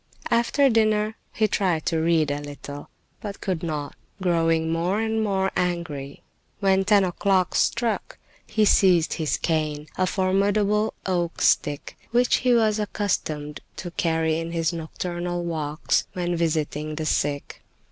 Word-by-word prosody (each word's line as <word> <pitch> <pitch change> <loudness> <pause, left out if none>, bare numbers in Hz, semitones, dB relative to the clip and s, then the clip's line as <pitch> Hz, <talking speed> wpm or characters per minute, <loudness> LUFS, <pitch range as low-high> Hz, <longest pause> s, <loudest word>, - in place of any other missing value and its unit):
After 235 +4 +3
dinner 215 -2 +2 0.2
he 220 - +1
tried 180 -6 0
to 165 - +1
read 160 -3 +2
a 145 +1 -2
little, 145 0 -8 0.3
but 200 -2 -6
could 185 -5 -2
not, 150 -4 -4 0.2
growing 165 -3 +1
more 175 +5 0
and, 220 0 0
more 190 -2 0
angry. 160 -6 -3 0.4
When 195 -1 +3
ten 205 0 +5
o'clock 185 0 +1
struck 230 -1 0 0.3
he 215 -1 +2
seized 180 -5 +4
his 155 -3 -1
cane, 155 -2 -1
a 185 - +3
formidable 200 +3 +1
oak 175 -3 -1
stick, 145 -1 +1
which 245 +1 +3
he 250 -1 +3
was 215 -2 +3
accustomed 155 -8 -2 0.2
to 175 - -6
carry 160 -2 0
in 165 0 -5
his 165 -1 0
nocturnal 175 +2 -4
walks 155 -2 -1
when 175 -1 -1
visiting 155 -2 -1
the 155 0 -3
sick. 145 -1 -1
175 Hz, 140 wpm, -24 LUFS, 160-205 Hz, 0.4 s, ten